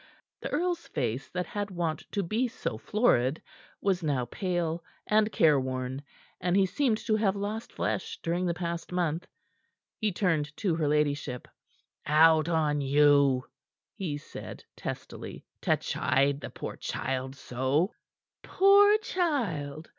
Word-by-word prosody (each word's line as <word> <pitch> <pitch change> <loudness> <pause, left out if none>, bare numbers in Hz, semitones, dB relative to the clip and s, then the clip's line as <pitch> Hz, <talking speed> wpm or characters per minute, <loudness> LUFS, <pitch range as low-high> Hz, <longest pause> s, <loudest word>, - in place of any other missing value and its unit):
The - - -4
earl's 345 +2 -1
face 125 -3 -2
that 180 0 -2
had 205 -1 -4
wont 170 -4 -3
to 200 - -1
be 220 +8 0
so 245 - -4
florid, 155 - +2 0.4
was 190 -2 +1
now 140 -6 0
pale 170 - -2 0.2
and 215 0 +3
careworn, 130 -5 +1 0.4
and 180 +1 +1
he 195 - +5
seemed 230 +3 +1
to 220 - +2
have 205 -2 +2
lost 205 +3 -4
flesh - - -2
during 175 +2 0
the 170 - 0
past 170 0 -4
month. 175 -1 -1 0.7
He 215 -2 +1
turned 160 -6 0
to 195 -6 +1
her 160 -2 0
ladyship. 145 -4 0 0.6
"Out 155 +1 +5
on 150 -3 +1
you!" 140 -2 +4 0.5
he 175 -9 -3
said 145 - -9
testily, - - -7 0.2
"to - - +2
chide 140 +1 +1
the - - -6
poor - - -7
child 130 0 -3
so!" 135 - 0 0.5
"Poor 405 +2 +6
child!" 205 - -2
165 Hz, 135 wpm, -29 LUFS, 145-205 Hz, 0.7 s, Poor